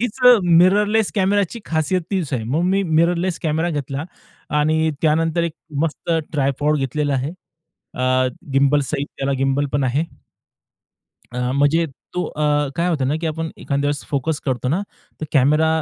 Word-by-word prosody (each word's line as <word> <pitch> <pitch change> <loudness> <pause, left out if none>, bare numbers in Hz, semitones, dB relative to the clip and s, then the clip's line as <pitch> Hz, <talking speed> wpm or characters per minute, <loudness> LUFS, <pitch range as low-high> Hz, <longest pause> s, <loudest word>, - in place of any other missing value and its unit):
हीच 245 +1 -2 0.4
मिररलेस 205 +4 +4
कॅमेराची 200 +2 +1
खासियत 160 +3 0
तीच 180 -8 -2
आहे. 120 -4 -1
मग 145 +9 0
मी 195 +2 +2
मिररलेस 170 +1 +1
कॅमेरा 160 +2 0
घेतला 145 0 -3 0.5
आणि 160 +1 +2
त्यानंतर 165 +2 +2
एक 170 -2 -1 0.3
मस्त 165 +1 -3 0.2
ट्रायपॉड 145 +1 +1
घेतलेलं 145 +2 -1
आहे. 135 +3 -1 0.6
अ, 130 0 +1 0.3
गिम्बलस 140 0 +3
सहित, 140 - -2
त्याला 135 0 -1
गिम्बल 135 +2 +1
पण 140 -1 +1
आहे. 135 +5 +1 1.3
अ, 125 - -4
म्हणजे 145 +5 +3 0.3
तो 180 - 0
अ, 150 - -3 0.3
काय 170 +1 0
होतं 140 -6 0
ना 150 - +1
की 165 - -1
आपण 160 +1 -3
एखाद्यां 140 0 -2
वेळेस 145 0 -1
फोकस 145 +2 -1
करतो 130 -1 -1
ना, 180 +7 +1 0.4
तर - - -2
कॅमेरा 150 +3 +4
155 Hz, 155 wpm, -20 LUFS, 140-170 Hz, 1.3 s, मिररलेस